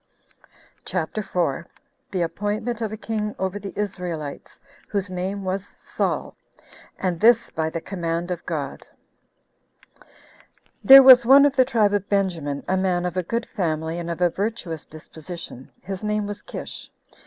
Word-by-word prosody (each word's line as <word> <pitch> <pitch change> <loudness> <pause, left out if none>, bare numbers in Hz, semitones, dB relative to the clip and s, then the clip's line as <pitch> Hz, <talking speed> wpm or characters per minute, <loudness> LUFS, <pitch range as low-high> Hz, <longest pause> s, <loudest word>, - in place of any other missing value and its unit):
CHAPTER 180 +4 -3
4. 170 -4 -2 0.4
The 185 -3 -1
Appointment 215 +6 -3
Of 220 -2 -2
A 215 - -5
King 210 -1 -3
Over 190 +1 -2
The 200 -1 -7
Israelites, 180 -8 -5 0.3
Whose 200 -2 -2
Name 190 +2 -3
Was 190 +1 -2
Saul; - - -4 0.6
And 180 -3 -2
This 235 +2 +4
By 160 0 -1
The 165 +1 -5
Command 170 -1 -3
Of 175 - -4
God. 145 -5 -4 1.1
1. - - -22 0.8
Ther 270 0 +12
was 260 -1 +9
one 275 +4 +7
of 285 -1 +2
the 260 -1 +5
tribe 215 -5 +2
of 205 -1 -1
Benjamin, 170 -8 -1
a 190 - +1
man 180 -2 0
of 180 -1 -3
a 185 - +1
good 230 +7 -3
family, 160 -2 -2
and 170 0 -5
of 170 +1 -4
a 175 -1 +4
virtuous 195 -6 -4
disposition; 155 -3 -9
his 190 +2 -6
name 210 0 0
was 205 0 -6
Kish. - - -8
190 Hz, 155 wpm, -23 LUFS, 170-210 Hz, 1.1 s, Ther